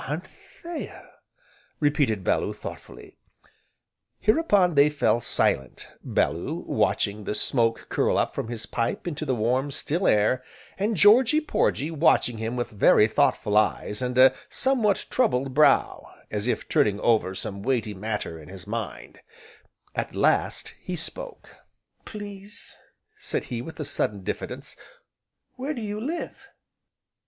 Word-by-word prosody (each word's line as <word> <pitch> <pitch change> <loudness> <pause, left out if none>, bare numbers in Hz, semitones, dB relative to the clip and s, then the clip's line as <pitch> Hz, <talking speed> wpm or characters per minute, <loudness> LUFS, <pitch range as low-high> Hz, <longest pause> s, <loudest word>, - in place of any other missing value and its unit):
"Anthea!" 190 - -8 0.7
repeated 145 -9 +1
Bellew, - - 0
thoughtfully. - - -10 1.0
Hereupon 205 - +3
they 140 0 +5
fell 145 -5 +1
silent, 65 - -1
Bellew - - -1
watching 105 0 0
the 105 - -2
smoke 115 -2 +1
curl - - +1
up - - 0
from - - -4
his 115 -2 -5
pipe 115 0 -2
into 155 -3 -4
the 130 -3 0
warm, 125 +5 0
still 160 +6 -1
air, 110 +5 +3 0.4
and 210 +1 0
Georgy 235 - +6
Porgy 165 - 0
watching 140 -7 +2
him 115 +2 -3
with 120 0 -3
very 105 0 +5
thoughtful 105 -1 +1
eyes, 105 0 +1
and 125 0 -2
a 130 +1 +7 0.2
somewhat 245 -7 +1
troubled 135 - +1
brow, 145 0 +3 0.2
as 105 +2 -2
if - - -1
turning 105 -1 +2
over 110 -5 +2
some 100 +1 -5
weighty 115 -3 -1
matter 105 -4 -4
in 75 - -13
his 95 -2 -10
mind; 115 0 -6 0.7
at - - -4
last, - - +1
he 180 - -4
spoke: - - -5 0.5
"Please," 205 0 -10 0.4
said - - -2
he, 115 - -2
with 160 +5 -9
a 150 - -3
sudden 100 -6 -1
diffidence, - - -5 0.8
"where 280 +4 -3
do 240 - -5
you 210 0 -4
live?" 325 +6 -3
130 Hz, 135 wpm, -25 LUFS, -, 1.0 s, a